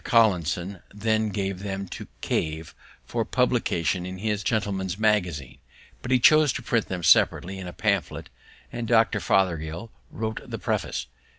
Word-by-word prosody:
Collinson 95 -4 +2
then 110 +1 0
gave 95 -2 -2
them 100 -1 -4
to - - -7
Cave 80 +1 -2 0.3
for - - -1
publication 90 +2 +1
in 90 +1 -6
his 105 +1 -1
Gentleman's 95 -4 -1
Magazine; 90 - 0 0.4
but 125 - -6
he 130 - +5
chose 155 +3 +6
to - - -5
print 115 -3 0
them 90 -2 -4
separately 95 +4 +4
in 95 - -6
a - - -5
pamphlet, - - -1 0.4
and 120 -1 -4
Dr. 115 -2 +3
Fothergill 90 +2 0 0.2
wrote 110 0 -4
the - - -6
preface. - - -2
95 Hz, 150 wpm, -25 LUFS, 90-110 Hz, 0.4 s, chose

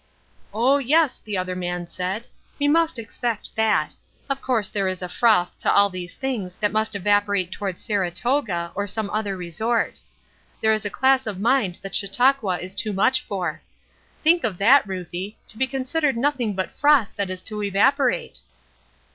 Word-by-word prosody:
'Oh, 255 +6 +3
yes,' 290 +1 +2
the 210 -2 -3
other 185 0 -2
man 175 -1 -3
said; 185 +6 -4 0.3
'we 290 - +2
must 330 -1 +2
expect 230 +1 -4
that. 220 -1 +1 0.4
Of 275 0 -2
course 235 -5 +1
there 195 -2 -1
is 185 -1 -3
a - - -3
froth 180 -2 +2
to - - +1
all 200 0 +4
these 180 -1 -6
things 225 -9 -4
that 210 -1 0
must 215 0 0
evaporate 200 -2 +1
toward 195 -3 -4
Saratoga, 195 -1 -1
or 200 +1 -3
some 210 +1 -2
other 205 -3 -2
resort. 220 +7 -2 0.6
There 220 0 +3
is 215 -1 -2
a - - 0
class 265 +2 +2
of 200 -3 -4
mind 220 -5 +1
that 195 - -7
Chautauqua 215 -1 +2
is 185 +2 -7
too 210 +1 -1
much 255 +7 +3
for.' 180 -6 -4 0.6
Think 335 +2 +5
of 210 -6 -1
that, 235 +5 +5
Ruthie, 185 +2 -6
to - - -5
be 260 +3 +1
considered 270 +1 -1
nothing 245 -5 0
but 190 0 -2
froth 290 -7 +3
that 200 -2 -2
is 185 0 -5
to 210 -1 -3
evaporate!" 270 - +1
210 Hz, 170 wpm, -23 LUFS, 190-255 Hz, 0.6 s, Think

